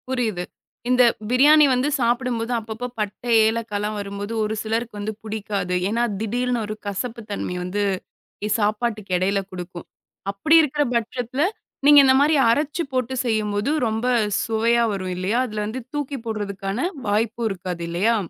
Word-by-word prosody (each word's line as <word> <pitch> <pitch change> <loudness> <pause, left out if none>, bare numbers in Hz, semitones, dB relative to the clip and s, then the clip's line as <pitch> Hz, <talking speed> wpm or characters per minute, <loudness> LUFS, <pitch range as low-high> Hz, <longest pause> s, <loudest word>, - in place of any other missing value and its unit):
புரியுது. 225 -8 -1 0.5
இந்த 250 0 +5 0.3
பிரியாணி 295 +5 +6
வந்து 255 +3 +1
சாப்பிடும்போது, 240 -1 0
அப்பப்போ 225 +2 -5
பட்டை, 210 +3 -3 0.2
ஏலக்காலாம் 215 -2 -2
வரும்போது, 200 +2 -5
ஒரு 215 0 -1
சிலருக்கு 225 0 -2
வந்து 210 +1 -3
புடிக்காது. 210 -3 -3
ஏன்னா, 200 +6 0 0.2
திடீர்னு 245 +2 0
ஒரு 215 - -4
கசப்பு 230 +4 -4
தன்மை 195 -2 -3
வந்து 195 +3 -1 0.6
இ - - 0
சாப்பாட்டுக்கு 215 -1 -1
எடையில 195 +2 +1
குடுக்கும். 180 -1 -8 0.4
அப்படி 255 +12 +3
இருக்கிற 295 -1 +1
பட்சத்தில, 245 +3 -1 0.4
நீங்க 290 0 +9
இந்த 260 0 +5
மாரி 305 +2 +4
அரைச்சு 295 +7 +1
போட்டு 255 0 -1
செய்யும்போது, 215 0 0 0.2
ரொம்ப 220 +2 -2 0.4
சுவையா 230 +1 +2
வரும் 185 -2 -3
இல்லையா? 190 +6 0
அதில 210 -2 -3
வந்து 245 +5 -4
தூக்கி 290 -1 -2
போடுறதுக்கான 205 - -2 0.2
வாய்ப்பும் 225 +2 0
இருக்காது 180 -3 -5
இல்லையா? 200 +7 +2
220 Hz, 140 wpm, -23 LUFS, 205-245 Hz, 0.6 s, நீங்க